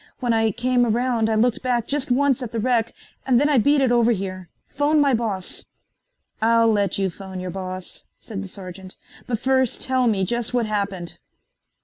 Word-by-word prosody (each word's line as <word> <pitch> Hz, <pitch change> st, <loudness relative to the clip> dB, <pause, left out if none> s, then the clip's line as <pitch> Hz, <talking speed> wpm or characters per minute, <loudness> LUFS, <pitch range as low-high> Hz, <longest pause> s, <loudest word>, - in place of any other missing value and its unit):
When 245 Hz, -3 st, +1 dB
I 225 Hz, 0 st, +2 dB
came 245 Hz, +3 st, +1 dB
around 235 Hz, -1 st, +1 dB
I 220 Hz, -, +1 dB
looked 235 Hz, +2 st, +2 dB
back 245 Hz, -3 st, 0 dB
just 280 Hz, 0 st, -2 dB
once 270 Hz, +1 st, +2 dB
at 240 Hz, -3 st, -5 dB
the 230 Hz, -, -2 dB
wreck 235 Hz, -1 st, 0 dB, 0.3 s
and 250 Hz, -3 st, +3 dB
then 290 Hz, -, +3 dB
I 280 Hz, -4 st, +4 dB
beat 285 Hz, +5 st, +3 dB
it 260 Hz, -2 st, +2 dB
over 240 Hz, -1 st, +4 dB
here. 185 Hz, -3 st, -5 dB, 0.2 s
Phone 295 Hz, +2 st, +1 dB
my 280 Hz, -2 st, +3 dB
boss." 215 Hz, -6 st, -2 dB, 0.8 s
"I'll 230 Hz, 0 st, +4 dB
let 200 Hz, -3 st, +1 dB
you 195 Hz, -2 st, 0 dB
phone 190 Hz, +1 st, -8 dB
your 180 Hz, 0 st, -5 dB
boss," 185 Hz, -1 st, -7 dB
said 205 Hz, -4 st, -7 dB
the 200 Hz, -, -6 dB
sergeant, 185 Hz, -1 st, -10 dB, 0.3 s
"but 235 Hz, -, -1 dB
first 260 Hz, +1 st, +1 dB
tell 260 Hz, -1 st, +1 dB
me 195 Hz, -4 st, +1 dB
just 240 Hz, +4 st, -2 dB
what 240 Hz, -2 st, +2 dB
happened." 200 Hz, -5 st, -3 dB
230 Hz, 195 wpm, -22 LUFS, 195-250 Hz, 0.8 s, I